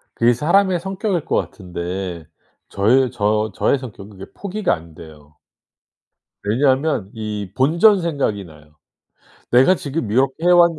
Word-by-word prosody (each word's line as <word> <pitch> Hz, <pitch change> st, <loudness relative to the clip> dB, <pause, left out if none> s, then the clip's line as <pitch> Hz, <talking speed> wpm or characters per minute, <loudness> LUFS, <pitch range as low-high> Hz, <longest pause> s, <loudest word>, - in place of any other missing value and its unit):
그게 120 Hz, +1 st, +3 dB
사람의 180 Hz, -, +2 dB
성격일 190 Hz, -1 st, -2 dB
것 -, -, -1 dB
같은데 90 Hz, -2 st, -5 dB, 0.4 s
저의 125 Hz, +6 st, +2 dB
저 105 Hz, -2 st, 0 dB
저의 140 Hz, -, +2 dB
성격은 105 Hz, -5 st, -10 dB
그게 95 Hz, -, -11 dB
포기가 205 Hz, +1 st, -1 dB
안 80 Hz, -1 st, -14 dB
돼요. 75 Hz, -2 st, -15 dB, 1.1 s
왜냐하면 130 Hz, 0 st, +1 dB
이 105 Hz, -3 st, -5 dB
본전 170 Hz, +9 st, +4 dB
생각이 140 Hz, -12 st, -1 dB
나요. 75 Hz, -1 st, -17 dB, 0.8 s
내가 130 Hz, +10 st, +5 dB
지금 140 Hz, -, -4 dB
이렇게 130 Hz, +2 st, +2 dB
해 -, -, +5 dB
왔는 170 Hz, -2 st, +5 dB
120 Hz, 280 characters per minute, -20 LUFS, 95-165 Hz, 1.1 s, 내가